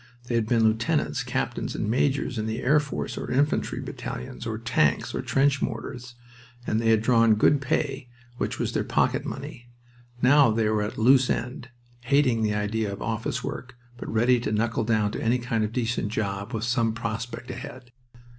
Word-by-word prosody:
They 120 - -4
had 115 -2 +1
been 115 -1 +3
lieutenants, 110 +1 +1
captains, - - -3
and - - -2
majors 130 +1 0
in 110 - -2
the 110 +1 -3
air 150 +4 +5
force, 145 -2 -4
or - - -5
infantry 140 +4 +1
battalions, 65 - -6
or 110 -1 -3
tanks, 115 - +1
or - - -2
trench 140 +1 +2
mortars, 120 0 -5 0.5
and 110 - 0
they 115 - +2
had 110 -1 +4
drawn 115 -2 +5
good 140 +6 +3
pay, 135 -2 -2 0.3
which - - -2
was - - -1
their - - 0
pocket - - +1
money. 120 0 -7 0.5
Now 135 +2 +6
they 110 0 +1
were 110 -1 +1
at 105 - -4
a - - -3
loose 130 +2 +5
end, 125 +1 -3 0.4
hating 130 -3 +3
the 105 -1 +1
idea 105 0 -1
of 100 - -6
office 115 +2 -3
work, 125 0 -6 0.2
but - - -7
ready 120 +3 +3
to 115 - -3
knuckle 115 +1 0
down 110 -2 +1
to - - -5
any 120 +2 +2
kind 120 -2 -1
of 105 - -2
decent 120 -2 -1
job 100 -1 -3
with 110 -1 -3
some 115 -1 +1
prospect 115 +1 -5
ahead. 125 -1 -9
115 Hz, 190 wpm, -26 LUFS, 110-125 Hz, 0.5 s, Now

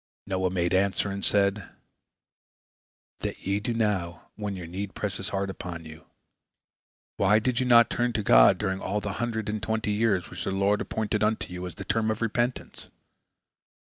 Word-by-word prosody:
Noah 95 -1 0
made 85 -1 0
answer, 100 +1 +2
and 100 0 -4
said: 100 0 +2 1.5
"That - - -4
ye 100 +2 +1
do 105 +3 -2
now, 100 -7 -1
when 105 -2 -4
your 90 -2 -6
need 95 +4 -5
presses 100 0 -3
hard 100 0 -2
upon 85 -3 -7
you. 80 0 -12 1.1
Why 100 +2 +4
did 120 +2 0
you 130 - 0
not 120 -1 +6
turn 120 0 +1
to 110 - -1
God - - +7
during 95 -2 -2
all 105 +2 -1
the 105 -1 -4
hundred 110 -2 -2
and 105 0 -2
twenty 110 -1 -1
years 105 -4 +1
which - - -6
the - - -2
Lord 100 +2 +2
appointed 105 -1 -1
unto 105 -4 0
you 90 0 -5
as 90 - -9
the - - -7
term 110 -1 +1
of 110 +1 -1
repentance? 120 +2 -2
100 Hz, 180 wpm, -27 LUFS, 95-110 Hz, 1.5 s, God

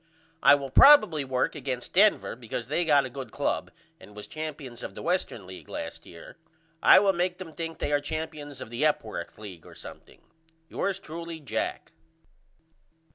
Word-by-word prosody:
I 140 +1 +8
will 140 -2 -5
probily 215 - +7
work 130 -1 -1
against 130 -4 -5
Denver 205 +3 +4
because 115 0 -5
they 155 +7 -1
got 145 -3 +4
a - - -5
good 130 -2 -7
club - - -2 0.3
and 105 - -15
was 105 - -7
champions 145 -6 -7
of - - -7
the - - -8
Western 175 - -1
League 95 0 -11
last - - -7
year. 85 - -13 0.4
I - - +8
will 195 0 +4
make 180 0 -1
them 175 -4 -9
think 165 0 -5
they - - -2
are 145 0 +2
champions 150 -2 -6
of 110 - -8
the 120 +4 -2
Epworth 115 - -1
League 95 -7 -10
or - - -14
something. - - -12 0.5
Yours 195 -1 -2
truly, 170 -2 -7
JACK. 145 - -4
145 Hz, 175 wpm, -27 LUFS, 125-165 Hz, 0.5 s, I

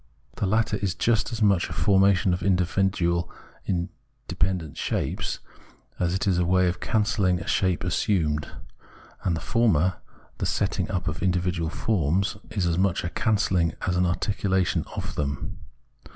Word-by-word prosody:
The 100 - 0
latter 110 +1 +1
is 95 -4 -2
just 115 +5 +1
as 115 -1 -1
much 100 -4 +3
a - - -5
formation 95 +3 +3
of 90 - -2
independent 95 +1 +1 0.7
individual 95 - -3
shapes, - - -2 0.6
as 90 0 +1
it 95 - -1
is 95 -3 +2
a - - +3
way 90 +1 +3
of 90 0 -1
cancelhng 105 -5 +1
a 80 - -7
shape 95 -2 +1
assumed; 80 -5 0 0.8
and 85 - +1
the - - -3
former, 95 -6 +2 0.4
the - - 0
setting - - -1
up 90 -2 -2
of 85 -2 -3
individual 90 -3 0
forms, 95 -1 0
is 100 -5 -1
as 85 0 +1
much 95 -2 +1
a 85 - -2
cancelling 95 -7 +1
as 90 - 0
an 90 0 +2
articulation 95 0 0
of - - -4
them. 70 -1 -3
90 Hz, 150 wpm, -25 LUFS, 85-100 Hz, 0.8 s, much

